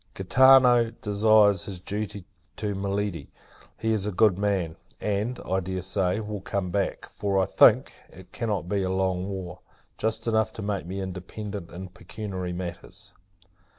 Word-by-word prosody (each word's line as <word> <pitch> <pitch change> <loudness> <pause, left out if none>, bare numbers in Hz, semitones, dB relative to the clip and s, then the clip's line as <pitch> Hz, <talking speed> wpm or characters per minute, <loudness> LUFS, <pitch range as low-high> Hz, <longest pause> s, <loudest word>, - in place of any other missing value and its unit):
Gaetano 125 +3 +6
desires 105 -2 +3
his 95 -2 -5
duty 100 0 -5 0.3
to 105 -1 -2
Miledi! 100 -5 -2 0.5
He 110 0 0
is 105 -2 0
a - - -1
good 105 0 +4
man; 95 -5 -1 0.2
and, 105 +4 -2
I 95 +1 0
dare 95 0 -4
say, 95 +2 0
will 105 -2 -5
come 95 -2 -3
back: 100 -1 -1
for, 100 -1 -2
I 95 - +3
think, - - +5 0.2
it 95 +1 -15
cannot 105 -6 -2
be 100 +1 0
a 95 - -1
long 95 0 0
war; 90 -2 -6 0.4
just 110 0 -1
enough 110 -1 +1
to 110 - -7
make 100 -4 -2
me 95 +2 -4
independent 95 0 -6
in 90 +2 -8
pecuniary 95 0 -6
matters. 90 -1 -7
100 Hz, 155 wpm, -26 LUFS, 95-105 Hz, 0.5 s, Gaetano